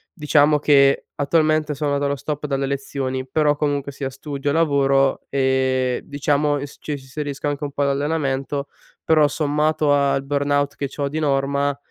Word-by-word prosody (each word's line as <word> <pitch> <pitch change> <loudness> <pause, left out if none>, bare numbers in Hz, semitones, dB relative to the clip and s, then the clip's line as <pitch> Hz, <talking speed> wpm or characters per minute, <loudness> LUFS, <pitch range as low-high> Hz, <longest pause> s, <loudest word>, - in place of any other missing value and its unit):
diciamo 150 -2 +3
che 140 -2 +4
attualmente 155 +1 +1
sono 145 0 -1
dallo 140 0 0
stop 150 +3 -4
dalle 135 -1 -1
lezioni, 135 -1 -3
però 150 +2 +2
comunque, 145 -1 -1
sia 135 -1 -4
studio 140 +1 -4
lavoro, 140 -3 +2
ehm, 130 -2 +1
diciamo 145 0 0
s 145 - -10
ci - - -6
inserisco 145 +1 -5
anche 145 0 -3
un 145 - -3
po' 145 - -1
d'allenamento, 140 -1 -1 0.4
però 155 -2 +4
sommato 150 0 +1
al 140 -1 +2
burnout 145 0 0
che 140 - -3
c'ho 140 +1 -3
di 155 +3 -3
norma, 140 -1 0
145 Hz, 150 wpm, -21 LUFS, 135-150 Hz, 0.4 s, che